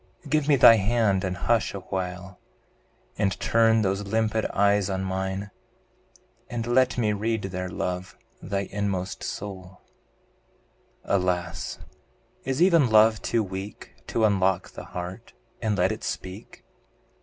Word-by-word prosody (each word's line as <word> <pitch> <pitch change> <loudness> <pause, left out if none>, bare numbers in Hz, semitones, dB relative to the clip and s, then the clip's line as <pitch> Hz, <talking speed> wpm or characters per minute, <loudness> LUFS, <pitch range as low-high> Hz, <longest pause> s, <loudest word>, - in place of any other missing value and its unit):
Give 150 0 +1
me 145 - +5
thy 115 -3 +8
hand 105 -2 +1
and 90 -1 -2
hush 115 +1 +1
awhile, 90 -1 -5 0.8
And 100 -2 0
turn 115 -1 +3
those 100 0 0
limpid 110 +1 0
eyes 100 0 +2
on 95 0 -2
mine, 95 +1 -3 1.0
And 115 -2 -3
let 125 +1 +2
me 110 -3 +1
read 110 +1 -1
there, 90 -1 -4
love! 90 +1 -4 0.2
thy 100 -1 -2
inmost 100 -2 -2
soul. 95 -2 -7 1.2
Alas! 90 -2 -1 0.7
is 135 +5 +1
even 170 -8 +5
love 110 0 +5
too 115 -2 0
weak 95 +1 -7
To 110 - +1
unlock 95 -3 +1
the - - -9
heart, 90 +6 -7 0.3
and 110 -3 0
let 90 +1 +2
it - - -6
speak? 95 +4 -7
100 Hz, 130 wpm, -26 LUFS, 95-115 Hz, 1.2 s, thy